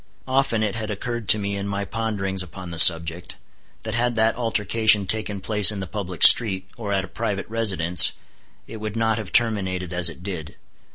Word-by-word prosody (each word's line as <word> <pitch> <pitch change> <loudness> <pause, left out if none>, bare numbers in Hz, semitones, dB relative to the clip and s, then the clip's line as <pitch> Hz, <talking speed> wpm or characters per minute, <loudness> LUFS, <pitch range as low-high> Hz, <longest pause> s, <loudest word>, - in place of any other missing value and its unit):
Often 130 -4 -1
it 105 -2 -3
had 110 -1 -6
occurred 115 0 -7
to - - +5
me 100 -1 -5
in 100 0 -6
my 100 0 -5
ponderings 100 -4 -5
upon 90 0 -11
the 85 - -5
subject, 85 0 +5 0.5
that 110 -1 -7
had 120 +1 -2
that 110 0 0
altercation 110 -2 +1
taken 105 +1 -1
place 105 +1 +4
in 105 - -8
the 95 - -6
public 90 -2 -6
street, 95 -5 +4
or 105 -4 -8
at 95 -1 -2
a - - -15
private 105 -4 -6
residence, 95 -7 +4 0.5
it 110 - -11
would 110 0 -8
not 110 -1 -2
have 100 -5 -9
terminated 95 -6 -1
as 90 -1 +2
it 85 +2 -14
did. 90 -6 -8
100 Hz, 190 wpm, -20 LUFS, 95-110 Hz, 0.5 s, to